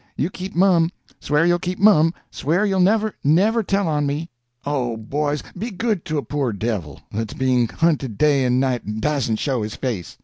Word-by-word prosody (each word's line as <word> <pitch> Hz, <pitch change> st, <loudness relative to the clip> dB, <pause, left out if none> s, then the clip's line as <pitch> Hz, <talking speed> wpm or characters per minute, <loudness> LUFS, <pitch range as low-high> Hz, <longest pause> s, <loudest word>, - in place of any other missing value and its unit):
You 160 Hz, +6 st, -1 dB
keep 190 Hz, +1 st, -7 dB
mum. 175 Hz, -3 st, +4 dB, 0.3 s
Swear 150 Hz, +3 st, +1 dB
you'll 175 Hz, 0 st, +3 dB
keep 180 Hz, +1 st, -3 dB
mum—swear 175 Hz, -2 st, +2 dB
you'll 195 Hz, -2 st, +1 dB
never, 215 Hz, +3 st, +3 dB
never 200 Hz, +11 st, +3 dB
tell 200 Hz, -2 st, 0 dB
on 150 Hz, -2 st, 0 dB
me. 150 Hz, +4 st, -3 dB, 0.3 s
Oh, 125 Hz, -5 st, -1 dB
boys, 145 Hz, +6 st, -2 dB
be 215 Hz, +6 st, -4 dB
good 210 Hz, -3 st, -2 dB
to 155 Hz, -3 st, -2 dB
a 145 Hz, -, -1 dB
poor 140 Hz, -5 st, -1 dB
devil 100 Hz, -, -4 dB
that's 110 Hz, 0 st, -4 dB
being 125 Hz, -2 st, +2 dB
hunted 140 Hz, -7 st, 0 dB
day 140 Hz, +1 st, +3 dB
and 125 Hz, 0 st, +2 dB
night, 130 Hz, -3 st, 0 dB
and 105 Hz, +1 st, -5 dB
dasn't 135 Hz, -4 st, 0 dB
show 130 Hz, -1 st, -1 dB
his 105 Hz, +2 st, -4 dB
face! 110 Hz, -, -4 dB
150 Hz, 190 wpm, -21 LUFS, 125-180 Hz, 0.3 s, mum